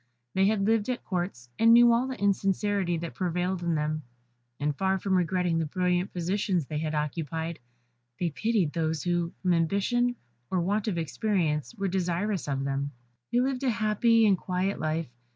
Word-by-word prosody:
They 190 +1 +3
had 205 -2 +1
lived 225 +1 +2
at 250 - -2
Courts, 175 - -3
and 230 +1 +7
knew 240 0 +7
all 240 +3 +2
the 260 - -5
insincerity 195 -2 +1
that 165 0 -5
prevailed 180 0 -1
in 170 -1 0
them; 155 0 -1 0.6
and 145 0 0
far 190 +4 +1
from 190 +1 -1
regretting 180 -2 +1
the 160 - -1
brilliant 180 +3 0
positions 180 -1 0
they 150 +2 -3
had 155 0 -2
occupied, 160 +2 -3 0.6
they 175 -2 0
pitied 185 +1 0
those 160 -2 -1
who, 175 -1 0
from 180 -1 +3
ambition 200 +9 +1 0.3
or 185 - +1
want 200 +5 0
of 195 -5 -1
experience, 165 0 -1
were 200 -2 -1
desirous 185 +1 -1
of 135 -1 -1
them. 140 +1 -1 0.4
They 245 - +3
lived 260 0 -1
a 265 - +1
happy 225 0 +3
and 195 -4 +4
quiet 185 +2 -1
life. 155 -2 -2
180 Hz, 175 wpm, -28 LUFS, 165-205 Hz, 0.6 s, and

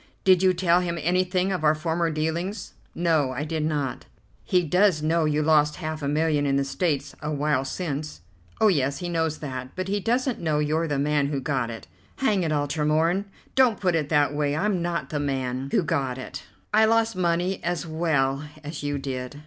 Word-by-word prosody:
"Did 185 -2 +5
you 190 -1 +5
tell 175 -1 +3
him 170 -1 -2
anything 180 +3 +1
of 180 -4 -2
our 155 0 +4
former 165 +2 0
dealings?" 170 +6 -3 0.2
"No, 160 -6 +1
I 130 - -3
did 155 0 -2
not." 145 -5 -2 0.4
"He 180 -1 +2
does 180 0 +3
know 160 +1 +2
you 150 0 +1
lost 150 -1 +3
half 155 -2 -5
a 140 - -2
million 150 0 +1
in 135 - +2
the 140 - +2
States 145 0 -1
a 150 - -3
while 145 -2 +1
since?" 150 - -4 0.4
"Oh, 220 - +5
yes, 140 -7 +1
he 175 +4 -4
knows 160 -2 0
that, 130 -3 -6
but 185 +1 -3
he 205 +1 0
doesn't 245 +3 0
know 155 -3 +1
you're 155 +2 0
the 145 -2 -1
man 145 0 +1
who 140 -1 -2
got 130 -3 -1
it." 115 -1 -8 0.3
"Hang 215 -8 +1
it 165 -3 -1
all, 145 -1 +1
Tremorne; 160 +6 +1 0.3
don't 255 -4 +4
put 180 -3 +1
it 155 -3 0
that 145 -2 +3
way. 145 -1 0
I'm 195 +1 0
not 170 0 -2
the 150 - -1
man 130 -2 -2
who - - +2
got 135 -4 -1
it; 130 - -8 0.3
I 220 +1 +6
lost 225 0 +2
money 180 +1 0
as 175 0 -2
well 150 -4 0 0.2
as 150 +1 -6
you 145 0 -2
did." 135 0 -5
155 Hz, 205 wpm, -25 LUFS, 145-180 Hz, 0.4 s, I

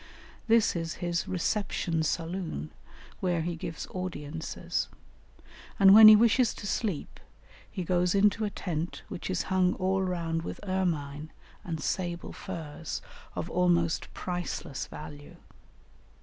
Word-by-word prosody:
This 225 -3 +4
is 165 -1 -3
his 175 -1 -2
reception 180 -2 -1
saloon 165 - -2 0.5
where 175 -3 0
he 170 +1 -2
gives 165 0 -5
audiences; 165 -4 -3 0.9
and 195 -1 +9
when 215 +1 +11
he 215 - +11
wishes 230 +2 +4
to - - -8
sleep 200 -5 -2 0.5
he 185 - -4
goes 180 +1 +1
into 205 +2 +3
a 210 - 0
tent 170 -4 -4
which - - -5
is 185 -2 0
hung 185 -1 +3
all 190 +1 +1
round 170 -3 -1
with - - -6
ermine 155 -5 -1 0.3
and 165 -3 -4
sable 175 +2 -3
furs 165 -4 -6 0.3
of - - -3
almost 170 -2 +1
priceless 175 -6 -4
value. 145 -1 -10
175 Hz, 125 wpm, -29 LUFS, 165-190 Hz, 0.9 s, when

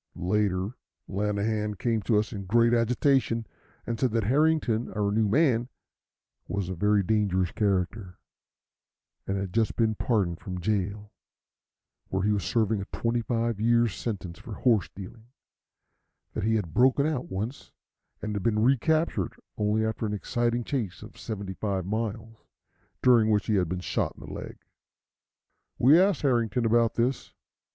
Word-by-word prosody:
Later, 95 0 0 0.4
Lanahan 105 +1 -1
came 115 +1 0
to 105 +2 +2
us 105 +2 -1
in 100 -2 -6
great 115 +4 +3
agitation, 120 0 +2 0.4
and 115 -1 -3
said 130 - +2
that 115 -2 +1
Harrington, 130 -2 +2
our 105 -1 0
new 110 +1 +2
man, 125 -1 +2 0.8
was 100 -2 -3
a - - -2
very 105 +3 +2
dangerous 95 -4 +1
character, 95 -2 -1 1.1
and 95 - -1
had 95 -2 -4
just 115 -1 +1
been 110 -2 +2
pardoned 100 -7 0
from 90 -2 -6
jail, 105 +2 -2 0.9
where 95 0 -1
he 105 - +2
was 100 -3 0
serving 110 +3 +1
a - - -5
twenty 115 +3 -1
five 115 -2 -1
years' 115 -1 +3
sentence 95 -3 -5
for 110 - -8
horse 115 -7 +2
stealing; 105 +4 -11 1.1
that - - -2
he 110 0 +2
had 90 -8 -2
broken 130 +3 +4
out 150 -5 -2
once, 105 +8 -5 0.5
and 105 0 -2
had 100 - -2
been 105 +2 +1
recaptured 135 - +1 0.2
only 105 +1 +1
after 110 0 -2
an 105 - -3
exciting 120 +3 -1
chase 110 - -3
of - - -12
seventy 100 -3 -5
five 95 -2 -2
miles, 110 +2 -4 0.6
during 120 -4 +5
which 105 -2 +2
he 110 - 0
had 90 -5 +1
been 90 +1 -2
shot 90 - -2
in - - -11
the - - -8
leg. - - -7 1.2
We 145 +7 +6
asked 195 -5 +2
Harrington 120 -3 +1
about 115 0 +3
this. 120 +3 -1
110 Hz, 155 wpm, -27 LUFS, 100-120 Hz, 1.2 s, We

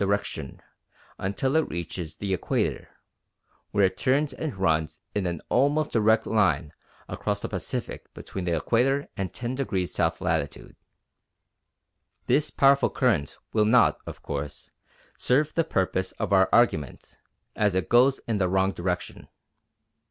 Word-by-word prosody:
direction 100 -8 -2 0.6
until 115 +9 -1
it 160 - +2
reaches 85 -1 -5
the 100 -2 -3
Equator, 90 - -1 0.8
where 100 -1 +3
it 95 - 0
turns 140 +2 +1
and 140 -4 -5
runs 80 -4 0
in 100 -3 -1
an 85 -2 -3
almost 145 +4 +2
direct 110 0 +3
line 85 -9 +1 0.4
across - - -2
the - - -4
Pacific - - -5
between 95 - -6
the 85 -1 +1
Equator 130 - +1
and 95 -2 -3
10° 120 -7 -2
south - - 0
latitude. - - -2 1.5
This 150 +1 +2
powerful 140 0 +4
current 105 - 0 0.2
will 110 -1 +3
not, 115 +2 +4
of - - -9
course, 75 +1 -5 0.5
serve 150 +4 +2
the 165 - +2
purpose 95 - -1
of - - -2
our 95 -1 +5
argument, 80 - +1 0.4
as 105 -3 +1
it 95 -3 0
goes 130 +3 +4
in 110 -3 0
the 90 -2 +1
wrong 95 +1 +2
direction. 90 -1 -4
100 Hz, 135 wpm, -26 LUFS, 90-130 Hz, 1.5 s, our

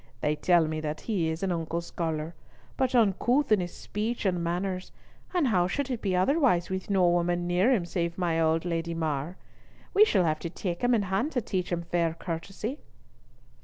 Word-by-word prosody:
They 150 0 +1
tell 175 +1 +3
me 155 0 -2
that 155 0 -4
he 185 -8 0
is 160 +3 -4
an 190 - 0
unco 165 0 -2
scholar, 165 -1 -3 0.4
but 260 -1 0
uncouth 240 +5 +3
in 215 - +6
his 175 -1 -4
speech 220 +2 -3
and 180 -3 +1
manners, 185 +2 -2 0.4
and 345 -8 +2
how 180 -5 +3
should 270 +7 -2
it 240 - -3
be 190 -3 0
otherwise 190 - +2
with 190 +1 -3
no 190 -3 +4
woman 175 0 +1
near 180 +7 +3
him 205 -9 +2
save 170 -1 -2
my 170 -3 +1
old 160 +1 +2
Lady 170 -1 -2
Mar? 155 +1 -2 0.6
We 410 - +7
shall 205 - +3
have 155 -2 0
to 170 - -4
take 175 0 -4
him 245 0 +4
in 215 - +1
hand 195 +11 -1
to 245 - +1
teach 185 -4 -3
him 170 -1 -1
fair 170 -1 0
courtesy." 195 - -5
175 Hz, 200 wpm, -28 LUFS, 170-210 Hz, 0.6 s, We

